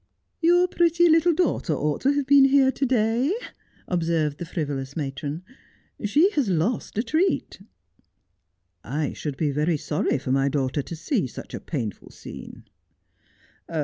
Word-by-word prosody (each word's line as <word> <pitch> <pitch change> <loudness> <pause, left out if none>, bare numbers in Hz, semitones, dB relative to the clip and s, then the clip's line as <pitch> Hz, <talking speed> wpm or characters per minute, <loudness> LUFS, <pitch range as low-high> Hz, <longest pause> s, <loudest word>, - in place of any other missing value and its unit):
' - - -51
Your 355 +1 +5
pretty 345 -1 +3
little 330 +1 +4
daughter 300 - 0
ought 150 0 -1
to 275 +2 +3
have 285 -1 0
been 275 0 +6
here 270 -1 +4
to 270 - -1
day,' 240 - +1 0.5
observed 165 -4 0
the 175 - -4
frivolous 140 -5 -4
matron; 145 +2 -4 0.3
' - - -21
she 305 - +4
has 285 - 0
lost 190 +6 -1
a 225 - +1
treat.' 320 - 0 0.7
' 90 +1 -50 0.2
I 145 - -2
should 145 -3 -5
be 150 -3 0
very 150 +3 +1
sorry 150 0 -1
for 130 -1 -4
my 135 +1 +2
daughter 135 0 -1
to 165 - -7
see 175 - -1
such - - -10
a - - -4
painful 115 - -5
scene.' - - -11
170 Hz, 160 wpm, -24 LUFS, -, 0.7 s, been